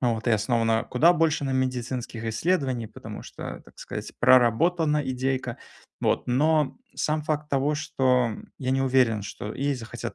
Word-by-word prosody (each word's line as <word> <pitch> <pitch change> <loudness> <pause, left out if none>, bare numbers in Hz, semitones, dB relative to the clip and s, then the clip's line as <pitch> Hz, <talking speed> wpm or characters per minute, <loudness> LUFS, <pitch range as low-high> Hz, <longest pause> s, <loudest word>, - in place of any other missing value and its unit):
вот, 120 -1 0
и - - +3
основана 115 +1 +2
куда 165 +8 +5
больше 160 -3 +1
на 135 - -1
медицинских 125 -3 -2
исследованиях, 125 - -1
потому - - -9
что, - - -8
так - - -19
сказать, - - -6
проработана 150 +6 +4
идейка, 130 -1 -2 0.4
вот. - - 0
Но 150 - +2 0.2
сам 155 0 -1
факт 150 -1 -2
того, 140 +2 +1
что 130 -5 +1 0.3
я 130 -2 -2
не 135 0 +1
уверен, 125 -5 +2
что 105 +1 -6
ей 140 +1 0
захотят 115 -3 -7
130 Hz, 155 wpm, -26 LUFS, 120-150 Hz, 0.4 s, куда